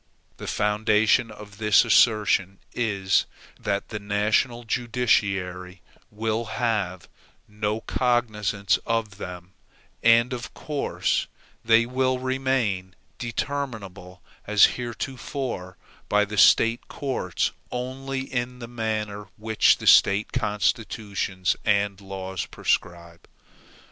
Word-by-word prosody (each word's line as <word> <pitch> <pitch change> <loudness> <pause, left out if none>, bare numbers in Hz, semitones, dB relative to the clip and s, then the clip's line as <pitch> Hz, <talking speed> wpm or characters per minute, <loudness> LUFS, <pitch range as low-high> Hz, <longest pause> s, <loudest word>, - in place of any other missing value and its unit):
The - - -8
foundation 105 +2 +2
of 105 -1 -12
this 105 -2 +5
assertion 105 -4 +3 0.2
is, 100 -5 +1 0.3
that 100 -1 -2
the 105 - -4
national 105 +4 0
judiciary 100 -7 -1 0.3
will 110 +2 -2
have 105 -6 -2 0.4
no 105 +1 -2
cognizance 105 -6 0
of 110 -3 -2
them, 90 0 -8 0.5
and 115 +2 +5
of 125 -1 -7
course 150 -2 -1 0.4
they 115 0 +5
will 130 +1 0
remain 130 -8 -1 0.2
determinable 115 -8 -5 0.2
as 105 -1 +5
heretofore 120 - -5 0.3
by 105 0 +3
the 105 +1 -6
State 115 +3 +4
courts 135 -2 -2 0.2
only, 130 +2 -4
and 125 -2 -3
in - - -16
the 120 -1 -8
manner 110 -3 -3
which 110 0 +3
the - - -8
State 100 +2 +5
constitutions 105 -3 -1
and 100 -1 +1
laws 95 -1 -5
prescribe. 85 -1 -3
105 Hz, 105 wpm, -25 LUFS, 100-120 Hz, 0.5 s, this